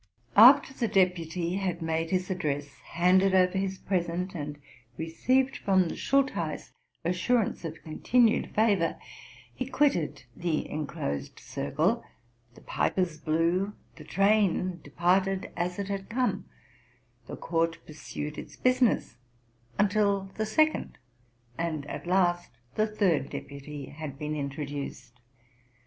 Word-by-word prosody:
After 265 +5 +8
the 240 -3 -1
deputy 180 -1 +1
had 185 -3 -2
made 165 0 -1
his 185 +1 -1
address, 145 -5 -3
handed 185 +3 +3
over 185 0 +4
his 190 0 -1
present, 180 0 -2
and 150 -3 -5 0.4
received 255 - +1
from 185 -3 +2
the - - -5
Schultheiss 265 - 0 0.3
assurance 195 +6 +1
of 160 -1 -7
con 155 - -8
tinued 240 -2 +3
favor, 205 -6 +2 0.6
he 255 - -4
quitted 270 - +1
the 170 -3 -1
enclosed 70 - -4
circle, 70 +1 -1 0.5
the - - -15
pipers 180 -5 -1
blew, 170 +6 +1 0.2
the - - -11
train 195 -3 +2
departed 185 +5 +1
as 175 +1 -2
it 200 -1 -3
had 195 -1 -4
come, 250 +2 0 0.8
the - - -7
court 165 0 0
pursued 150 -1 -6
its - - -10
busi 255 0 +2
ness, 240 - +2 0.6
until 200 -1 +2
the 215 0 -2
second 310 +8 +1 0.6
and 160 -4 -2
at 145 - -7
last 175 -1 +2 0.2
the 215 0 +1
third 185 -10 +1
deputy 140 0 -7
had 145 -2 -7
been 150 +1 -3
introduced. 140 -3 -5
180 Hz, 125 wpm, -28 LUFS, 155-200 Hz, 0.8 s, After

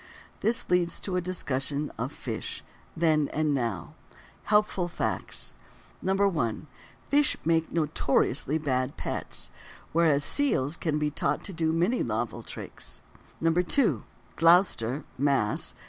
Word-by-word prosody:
This 235 +2 +3
leads 175 -1 +1
to 190 - -3
a 180 - +1
discussion 145 -5 -2
of: - - -3
Fish—Then, 155 -3 -2
and 155 -1 0
Now. 115 - -2 0.5
Helpful 210 -4 +2
Facts: 170 - -3 0.5
1. 190 - +1 0.4
Fish 290 0 +3
make 165 0 +2
notoriously 150 -2 +1
bad 130 -3 -1
pets, - - -3 0.4
whereas 155 -3 +4
seals 160 - +1
can 155 -3 -1
be 150 0 0
taught - - -1
to 195 - -7
do 160 -1 +1
many 175 +10 +1
novel - - -2
tricks. - - -7 0.4
2. 180 - +2 0.3
Gloucester 165 - +4 0.2
(Mass.) 135 -7 +2
160 Hz, 115 wpm, -28 LUFS, 140-180 Hz, 0.5 s, whereas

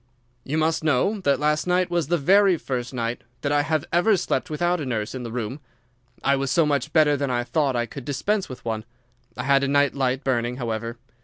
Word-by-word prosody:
"You 150 +4 -2
must 160 0 +1
know 155 - +2
that 140 -8 +1
last 150 +2 +1
night 180 0 +1
was 170 -4 0
the 175 +2 +2
very 190 +4 +4
first 125 -4 -4
night 120 -2 -3 0.2
that 145 - -1
I 145 0 +3
have 155 +1 -1
ever 195 +4 +4
slept 180 - -1
without 175 +2 0
a - - -3
nurse 110 -4 -2
in 130 - -5
the 115 -2 -6
room. 120 +3 -4 0.6
I 140 - +3
was 135 0 -2
so 165 +3 +3
much 145 0 0
better 150 -2 +4
that 140 -1 -2
I 120 -1 0
thought 140 0 0
I 120 0 0
could 135 +2 -9
dispense 190 - -1
with 125 -2 -10
one. 110 -1 -2 0.5
I 125 - -3
had 140 +1 +3
a - - +1
night 145 0 +3
light 135 0 -1
burning, 120 -2 0
however. 115 -1 -4
140 Hz, 225 wpm, -24 LUFS, 125-160 Hz, 0.6 s, very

